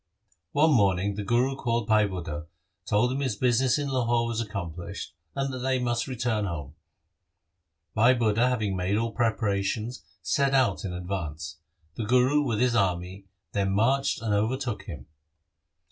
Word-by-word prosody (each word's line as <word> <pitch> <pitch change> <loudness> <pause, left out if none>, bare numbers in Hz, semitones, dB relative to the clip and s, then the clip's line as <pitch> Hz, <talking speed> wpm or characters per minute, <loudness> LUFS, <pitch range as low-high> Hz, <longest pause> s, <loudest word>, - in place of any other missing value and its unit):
One 155 +2 +4
morning 100 -5 +3
the 105 +1 -4
Guru 120 +6 +1
called 120 -3 -1
Bhai 110 -1 +4
Budha, 85 -5 -5 0.4
told 115 +4 +2
him 135 - -2
his 130 -6 -1
business 125 +3 +2
in 145 -1 -2
Lahore 120 -3 +1
was 115 -1 -1
accomplished, 90 -6 -6 0.2
and 135 -1 -1
they 130 0 +2
must 120 -2 -1
return 120 -4 -1
home. 75 -7 -5 1.2
Bhai 120 +4 +5
Budha, 115 +1 +2
having 110 -6 -1
made 95 +3 0
all 115 +1 -1
preparations, 110 0 -1 0.2
set 140 -2 +2
out 130 -2 +2
in 95 - -3
advance. 85 -3 -5 0.4
The 115 - -2
Guru, 125 +6 +4
with 120 -7 -1
his 125 -1 +2
army, 95 -1 -1 0.2
then 95 -1 0
marched 130 +4 +2
and 110 -2 0
overtook 120 +3 -1
him. 75 -9 -8
110 Hz, 150 wpm, -27 LUFS, 100-125 Hz, 1.2 s, Bhai